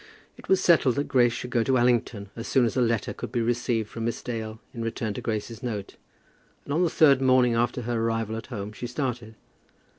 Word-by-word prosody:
It - - -15
was 190 - +5
settled 160 -9 +4
that 145 +1 -1
Grace 120 -2 +4
should 125 +1 -6
go 120 - +2
to 130 +3 +2
Allington 120 -4 +1
as 115 - -6
soon 130 -3 +3
as 115 - -2
a 130 - +2
letter 115 -2 0
could - - -7
be 120 - -1
received 115 -1 0
from 115 +1 -5
Miss 115 0 -3
Dale 110 -2 -5
in 115 - -6
return 115 -1 -3
to - - -6
Grace's 110 +1 -4
note, 110 -6 -5 0.7
and 140 - -3
on 165 - +2
the 175 - +3
third 140 -5 +5
morning 130 -2 +4
after 120 +1 0
her 115 0 -1
arrival 115 -1 -1
at 115 - -7
home 100 0 -5
she 120 - -6
started. 125 -3 -4
120 Hz, 220 wpm, -26 LUFS, 115-125 Hz, 0.7 s, was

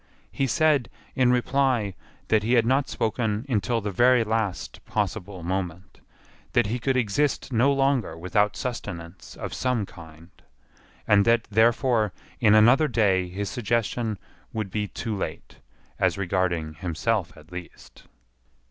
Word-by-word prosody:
He 135 - 0
said, 150 -4 +2 0.3
in 125 -1 +4
reply, 125 -4 +1 0.4
that 110 -1 +4
he 115 +4 0
had 120 -2 +4
not 135 +3 +2
spoken 110 -1 -1
until 115 -1 0
the 105 0 -3
very 120 +4 +4
last 110 -3 -3
possible 100 -3 -3
moment, 90 0 -4 0.5
that 120 - +4
he 115 +5 -2
could 130 +2 0
exist 130 +4 0
no 125 +5 +4
longer 135 - +1
without 105 +4 +1
sustenance 90 -9 -6
of - - -6
some 125 -5 0
kind, 80 -1 -14 0.8
and 100 -1 +5
that 115 0 +4
therefore 115 -1 +3 0.3
in 110 -2 +5
another 120 +8 +6
day 95 -8 +2
his 100 +3 -4
suggestion 115 -2 -1 0.3
would 110 -4 -4
be 105 +1 -2
too 110 +1 -4
late, 95 - -6 0.4
as - - +2
regarded 85 -5 -1
himself 90 +4 -1
at 75 +3 -16
least. 90 -1 -11
110 Hz, 140 wpm, -25 LUFS, 95-125 Hz, 0.8 s, another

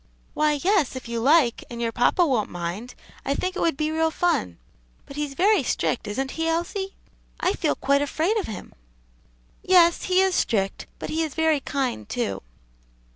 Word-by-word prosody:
"Why, 305 0 +2
yes, 370 -9 +2
if 260 - -7
you 235 0 -3
like, 270 -1 +3
and 235 - -7
your 230 -1 -1
papa 245 +10 +3
won't 250 -8 0
mind 175 +8 -5 0.3
I 275 - -1
think 370 +4 -2
it - - -3
would 330 -4 +1
be 310 0 0
real 320 0 +2
fun. 315 - 0 0.5
But 275 - -11
he's 295 -2 -3
very 410 +6 +4
strict, - - -1
isn't 265 +6 -2
he, 325 0 -2
Elsie? 345 +4 -2 0.4
I 370 - +1
feel 320 - 0
quite 280 +1 +2
afraid 320 +8 0
of 415 - -2
him." 210 -4 -8 0.9
"Yes, 345 -2 +4
he 370 0 +3
is 380 -1 +2
strict, 195 - 0
but - - -6
he 320 - 0
is 315 -3 -3
very 320 -2 +2
kind, 270 -3 -3
too." 240 -2 -2
300 Hz, 180 wpm, -24 LUFS, 245-345 Hz, 0.9 s, very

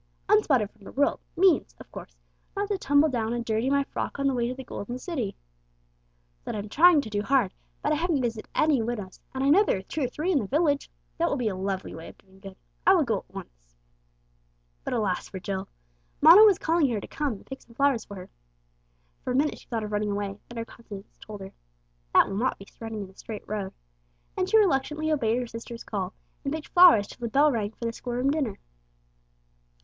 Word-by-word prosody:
"'Unspotted 295 - +4
from 220 - -23
the - - -10
world' 285 +1 +1 0.2
means, 365 -4 +3
of - - -13
course, - - -10 0.4
not 405 +1 0
to 405 - 0
tumble 285 0 +4
down 235 -5 -1
and 240 -1 -3
dirty 225 +3 0
my 280 0 +3
frock 275 - -5
on 275 - -1
the 275 - +3
way 240 -1 0
to 250 - -3
the 265 - -8
Golden 240 0 -6
City. 255 - -4 1.1
That - - -4
I'm 210 0 -5
trying 325 +4 +6
to 225 - -8
do 205 0 0
hard, 245 -4 +2 0.3
but 295 - +1
I - - +3
haven't 330 -2 +1
visited 225 -2 -3
any 300 -5 +3
widows, 220 -5 -4 0.2
and 265 - -1
I 275 - +3
know 375 +8 +6
there 410 - +1
are 190 - -7
two 305 - -5
or - - 0
three 310 +9 -2
in 310 - +3
the 210 - -3
village. 290 - +1 0.3
That 340 +1 +2
will 285 - 0
be 240 -4 0
a 190 - -4
lovely 190 0 -3
way 160 +1 -9
of - - -13
doing 190 0 -22
good. 195 -1 -10 0.3
I - - +6
will - - +4
go - - 0
at - - -21
once." - - -12 1.1
But - - -2
alas 205 -5 -1
for 190 - -6
Jill! 190 +1 -4 0.5
Mona 330 +7 +9
was 405 -4 +6
calling 320 -3 +2
her 225 -3 -1
to - - -9
come 290 -4 -2
and 195 - -12
pick 270 - -8
some 230 - -19
flowers 275 -4 +2
for 200 - -9
her. 185 -1 -10 0.9
For - - -5
a - - -1
minute 290 +3 +1
she - - -19
thought 225 -2 -2
of 210 - -5
running 210 0 0
away, 200 0 -3
then 240 - -9
her 230 - -3
conscience 210 -4 -12
told 210 -2 -9
her 190 0 -9 0.6
"That - - +7
will 195 - -4
not 255 +4 0
be 195 - -12
running 225 -2 -5
in 190 - -10
a - - -25
straight 215 0 -8
road," 200 -2 -3 0.6
and 370 - -1
she 445 - +5
reluctantly 310 -4 +2
obeyed 235 -6 +1
her 250 - -1
sister's 230 0 -8
call, 195 -3 -4 0.3
and 275 - -2
picked 310 0 -5
flowers 350 - +7
till - - -13
the - - 0
bell 290 +5 +4
rang 215 -3 -2
for 235 - -7
the 230 - -1
school 245 +1 -6
room 255 +3 +1
dinner. 275 -9 -1
240 Hz, 235 wpm, -27 LUFS, 205-290 Hz, 1.1 s, Mona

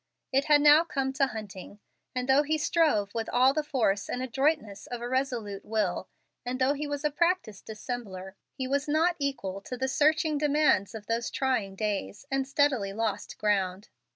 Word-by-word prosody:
It 270 +1 +3
had 295 -1 +5
now 300 +2 +7
come 270 -5 -2
to 275 0 +2
Hunting, 205 -3 -8 0.4
and 250 0 -2
though 270 +2 +5
he 310 +1 0
strove 300 - +1
with 225 -1 -3
all 255 +2 +4
the 310 - +1
force 220 -9 0
and 250 - -2
adroitness 260 -6 -1
of 245 - -5
a 240 - -4
resolute 245 -6 -2
will 210 -5 -1 0.3
and 245 +1 -3
though 260 +2 +2
he 295 +1 -4
was 290 0 -4
a 300 - +2
practiced 340 - 0
dissembler, 210 -4 -6 0.2
he 260 -2 -4
was 280 +2 0
not 320 +4 +2
equal 200 -9 -3
to 250 +5 -6
the 260 +1 -1
searching 305 +2 +2
demands 295 -10 +2
of 215 -2 -8
those 230 +1 -1
trying 235 -8 -1
days, 200 - -3
and 270 0 0
steadily 275 -8 +1
lost 225 +1 -3
ground. 195 -1 0
255 Hz, 180 wpm, -28 LUFS, 210-290 Hz, 0.4 s, now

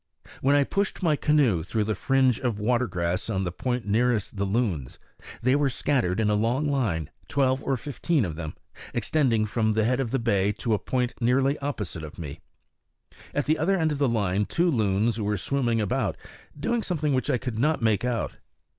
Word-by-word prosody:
When 140 +2 +4
I 145 - +5
pushed 200 +5 -2
my 160 -3 +3
canoe 140 - +3
through 105 +6 -1
the 110 +1 -1
fringe 130 +3 +2
of 120 -5 -1
water 120 +3 +1
grass 90 +1 -2
on 95 -3 0
the 90 - -2
point 125 +5 -2
nearest 110 0 +1
the 100 0 -1
loons, 95 - -1 0.5
they 130 +3 +4
were 145 -1 +2
scattered 120 -8 0
in 110 - +2
a 105 - +2
long 120 +8 +1
line, 110 - -1 0.2
twelve 135 -2 +1
or 135 - 0
fifteen 145 0 0
of 80 -4 -4
them, 80 -1 -6 0.4
extending 120 -8 +2
from 110 0 0
the 110 0 +2
head 125 +3 +1
of 130 -4 -1
the 135 - 0
bay 105 -4 +1
to 115 +2 -1
a 105 - +1
point 125 -2 -1
nearly 135 +4 +3
opposite 95 - -5
me. 75 -2 -7 1.0
At 145 - +1
the 155 +2 +1
other 190 +5 +2
end 160 -3 +1
of 145 - -3
the 140 -3 +3
line 105 -3 +1
two 175 - +1
loons 110 -1 +1
were 105 0 0
swimming 120 +1 0
about, 105 -3 -1 0.4
doing 235 +9 0
something 155 -8 -1
which 130 - 0
I - - +3
could 120 -2 -4
not 150 0 +1
make 110 -1 +2
out. 125 -3 -2
120 Hz, 200 wpm, -26 LUFS, 105-140 Hz, 1.0 s, I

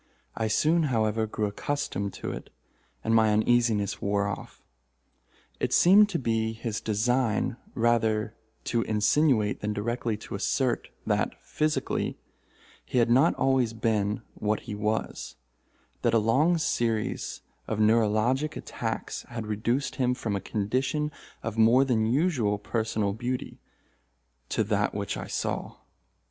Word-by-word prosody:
I 110 - -1
soon, 155 +9 +3
however, 110 -2 +1
grew 105 0 -2
accustomed 100 -2 -2
to - - -5
it, - - -8 0.5
and 115 - +1
my 110 -1 +5
uneasiness 105 -2 +2
wore 100 0 +1
off. 100 - -6 1.0
It - - -1
seemed 205 +4 +7
to 185 - -1
be 115 -4 0
his 110 -1 -4
design 110 +1 +1 0.2
rather 115 -2 +1 0.3
to 115 - 0
insinuate 110 +1 +2
than 105 0 -1
directly 115 +1 -2
to 110 - -10
assert - - 0 0.2
that, - - 0
physically, 155 0 -1 0.7
he - - -3
had 120 -1 +3
not 135 +7 +5
always 130 -4 +2
been 110 -1 0
what 105 0 -1
he 110 - -7
was—that 105 +1 -2 0.8
a - - +7
long 135 +11 +3
series 115 -8 -1 0.2
of 110 - -2
neuralgic 115 +6 +2
attacks - - -4
had 115 -2 -5
reduced 115 +8 -1
him 125 -2 +1
from 110 -4 -2
a 100 - -2
condition 130 +10 -1 0.3
of 110 0 -3
more 120 +5 +6
than 110 -4 +1
usual 125 - +1
personal 110 -1 -1
beauty, 125 +3 -4 0.9
to - - +1
that - - 0
which - - -2
I - - -6
saw. - - -3
115 Hz, 130 wpm, -27 LUFS, 105-125 Hz, 1.0 s, seemed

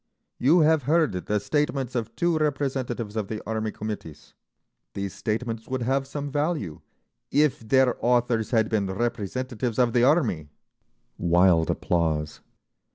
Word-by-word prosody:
You 160 +7 +5
have 155 0 +4
heard 160 -5 +3
the 100 +3 -1
statements 140 +1 -1
of 115 -2 -3
two 170 -1 +1
representatives 135 -7 -2
of 110 -3 -2
the 110 0 -4
Army 110 -1 -2
committees; 105 -9 -7 0.6
these 100 -1 -4
statements 115 0 -3
would 130 -2 -2
have 135 +2 0
some 145 0 -5
value 145 - -2 0.5
if 150 -1 +2
their 125 +3 +3
authors 120 -2 +2
had 110 -3 +2
been 105 -3 0
representatives 120 +3 -3
of 120 -2 +3
the 120 - +3
Army—" 125 - +2 0.7
Wild 85 -1 +4
applause. 80 -3 -1
120 Hz, 135 wpm, -25 LUFS, 105-135 Hz, 0.7 s, You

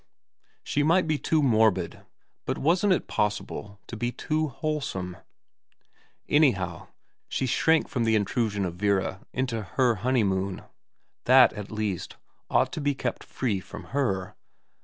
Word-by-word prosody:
She 145 - 0
might 165 +5 +3
be 155 -2 0
too 155 -2 +1
morbid, 110 -6 +2 0.4
but - - -1
wasn't 175 +7 +2
it - - -1
possible 105 -1 -3
to - - -8
be 120 +2 -2
too 155 +4 -1
wholesome? 135 - -3 1.1
Anyhow 100 - +2 0.4
she 130 - -1
shrank 160 +6 +3
from 125 - -1
the 110 0 +3
intrusion 105 -1 0
of 85 -1 -5
Vera 95 0 0
into 125 -3 -2
her 120 +3 +1
honeymoon. 100 -6 0 0.6
That, 130 0 +7
at 105 -2 -7
least, 105 -4 -3 0.3
ought - - +2
to 160 - -3
be 145 -1 +1
kept - - -3
free 110 -7 -2
from - - -10
her. 100 -8 0
115 Hz, 135 wpm, -27 LUFS, 100-145 Hz, 1.1 s, That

